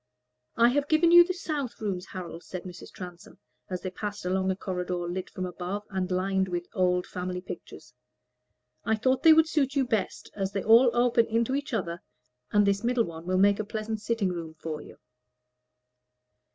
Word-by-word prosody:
"I 235 Hz, +1 st, +5 dB
have 285 Hz, +3 st, 0 dB
given 320 Hz, +2 st, +4 dB
you 345 Hz, 0 st, +10 dB
the 360 Hz, -, -3 dB
south 295 Hz, -, -4 dB
rooms, 195 Hz, -4 st, -3 dB
Harold," 175 Hz, -2 st, -7 dB
said 185 Hz, -2 st, -7 dB
Mrs. 180 Hz, -1 st, -10 dB
Transome, 180 Hz, -2 st, -10 dB, 0.3 s
as 185 Hz, -1 st, -4 dB
they 185 Hz, -, -3 dB
passed 205 Hz, +1 st, -5 dB
along 190 Hz, +1 st, 0 dB
a 190 Hz, -, +1 dB
corridor 180 Hz, -2 st, -3 dB
lit 185 Hz, +1 st, -4 dB
from 185 Hz, -3 st, -4 dB
above 180 Hz, +3 st, -4 dB
and 190 Hz, -2 st, -2 dB
lined 190 Hz, +1 st, 0 dB
with 175 Hz, -1 st, -3 dB
old 180 Hz, -1 st, +1 dB
family 180 Hz, 0 st, -4 dB
pictures. 180 Hz, -, -10 dB, 0.9 s
"I 220 Hz, -, +2 dB
thought 260 Hz, +4 st, +1 dB
they 325 Hz, -, +8 dB
would 320 Hz, 0 st, +6 dB
suit 285 Hz, -3 st, 0 dB
you 275 Hz, -2 st, +2 dB
best, 225 Hz, -5 st, -2 dB
as 195 Hz, -1 st, -2 dB
they 195 Hz, -, -2 dB
all 235 Hz, +3 st, +7 dB
open 240 Hz, -1 st, +3 dB
into 230 Hz, +3 st, 0 dB
each 285 Hz, +2 st, -2 dB
other, 175 Hz, -6 st, -2 dB, 0.5 s
and 205 Hz, 0 st, +4 dB
this 200 Hz, +1 st, +1 dB
middle 240 Hz, 0 st, +2 dB
one 165 Hz, 0 st, -9 dB
will 185 Hz, 0 st, +1 dB
make 200 Hz, +2 st, +4 dB
a -, -, 0 dB
pleasant 215 Hz, +1 st, -4 dB
sitting 220 Hz, -3 st, 0 dB
room 165 Hz, -3 st, -5 dB
for 155 Hz, -1 st, -5 dB
you." -, -, -13 dB
200 Hz, 190 wpm, -28 LUFS, 180-235 Hz, 0.9 s, you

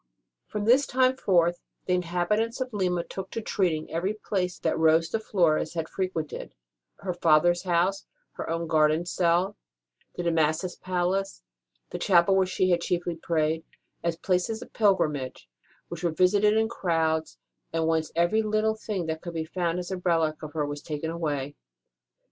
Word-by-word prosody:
From 210 Hz, -1 st, -3 dB
this 255 Hz, +5 st, +5 dB
time 255 Hz, 0 st, +3 dB
forth 175 Hz, -7 st, +2 dB, 0.3 s
the 180 Hz, -, +1 dB
inhabitants 180 Hz, +7 st, 0 dB
of 255 Hz, -2 st, -3 dB
Lima 180 Hz, -4 st, 0 dB
took 190 Hz, +2 st, -7 dB
to -, -, -4 dB
treating 175 Hz, -7 st, -1 dB
every 185 Hz, +6 st, -1 dB
place 185 Hz, -4 st, -2 dB
that -, -, 0 dB
Rose 160 Hz, +1 st, +4 dB
de 225 Hz, -, -1 dB
Flores 170 Hz, -6 st, +1 dB
had 165 Hz, -1 st, -2 dB
frequented 185 Hz, -5 st, -4 dB, 0.5 s
her 190 Hz, -2 st, -2 dB
father 170 Hz, -1 st, +4 dB
s 175 Hz, 0 st, -3 dB
house, 185 Hz, +2 st, 0 dB, 0.2 s
her -, -, -6 dB
own 165 Hz, +1 st, -1 dB
garden 155 Hz, +1 st, +2 dB
cell, 180 Hz, +3 st, +1 dB, 0.6 s
the 175 Hz, -, -3 dB
De 170 Hz, -, +1 dB
Massas 160 Hz, +3 st, +1 dB
palace, 185 Hz, +2 st, -2 dB, 0.5 s
the -, -, -4 dB
chapel 190 Hz, -1 st, +4 dB
where 190 Hz, -1 st, +3 dB
she 185 Hz, 0 st, +1 dB
had 170 Hz, -1 st, +2 dB
chiefly 175 Hz, 0 st, -1 dB
prayed 160 Hz, -1 st, 0 dB, 0.4 s
as 170 Hz, -1 st, 0 dB
places 185 Hz, +6 st, -1 dB
of -, -, -17 dB
pilgrimage, 150 Hz, -, +1 dB, 0.4 s
which 170 Hz, 0 st, -7 dB
were 170 Hz, -, +2 dB
visited 200 Hz, +6 st, +3 dB
in 220 Hz, 0 st, +3 dB
crowds, 160 Hz, -7 st, -1 dB, 0.3 s
and 165 Hz, 0 st, 0 dB
whence 160 Hz, -1 st, 0 dB
every 175 Hz, +6 st, +3 dB
little 215 Hz, 0 st, +1 dB
thing 210 Hz, -4 st, -4 dB
that 160 Hz, 0 st, -3 dB
could 170 Hz, -2 st, -7 dB
be 160 Hz, -1 st, -2 dB
found 170 Hz, 0 st, -1 dB
as 180 Hz, +1 st, -5 dB
a 190 Hz, -, -2 dB
relic 165 Hz, -4 st, 0 dB
of 155 Hz, -1 st, -8 dB
her 155 Hz, -2 st, 0 dB
was 145 Hz, 0 st, -5 dB
taken 155 Hz, +1 st, -4 dB
away. 145 Hz, -4 st, -3 dB
175 Hz, 170 wpm, -27 LUFS, 160-195 Hz, 0.6 s, this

